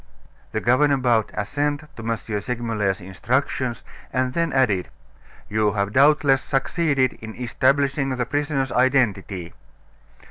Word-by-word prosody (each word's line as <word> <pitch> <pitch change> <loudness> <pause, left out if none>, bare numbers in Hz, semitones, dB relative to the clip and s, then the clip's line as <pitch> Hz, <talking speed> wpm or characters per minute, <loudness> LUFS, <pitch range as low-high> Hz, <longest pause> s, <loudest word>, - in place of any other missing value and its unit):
The 110 - -1
governor 140 +4 +3
bowed 120 -4 +2
assent 145 +7 -1
to - - -8
M. 115 0 -1 0.2
Segmuller's 110 -4 -2
instructions, 120 +6 -2 0.3
and 130 0 0
then 165 0 0
added: 115 -9 +1 0.6
"You 105 -1 +1
have 100 0 -1
doubtless 140 -1 +4
succeeded 135 -1 +1
in 110 -1 -8
establishing 135 +3 +1
the 125 -2 -1
prisoner's 145 -1 -1
identity." 105 -9 +1
130 Hz, 115 wpm, -23 LUFS, 110-140 Hz, 0.6 s, doubtless